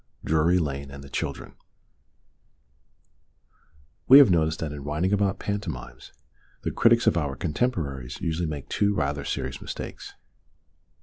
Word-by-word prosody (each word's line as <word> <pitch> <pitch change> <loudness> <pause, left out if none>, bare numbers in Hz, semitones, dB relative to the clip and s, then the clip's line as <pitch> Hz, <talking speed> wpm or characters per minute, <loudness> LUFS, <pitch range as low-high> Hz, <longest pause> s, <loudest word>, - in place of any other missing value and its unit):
DRURY 80 +3 +3
LANE 70 -4 -3
AND 70 0 -10
THE 70 - -13
CHILDREN - - -4 2.5
WE 135 - +10
have 140 -8 +8
noticed 80 -2 +2
that 80 -3 -3
in 75 -1 -7
writing 75 +7 -1
about 100 -1 +1
panto 100 -2 -3
mimes 60 -6 -9 0.5
the - - -1
critics 115 0 +4
of - - +3
our 70 -5 -1
contemporaries 75 - -2
usually 85 -2 -2
make 75 -3 -6
two 105 -1 +1
rather 70 -2 -1
serious 65 -2 -4
mistakes. - - -7
80 Hz, 135 wpm, -26 LUFS, 70-100 Hz, 2.5 s, WE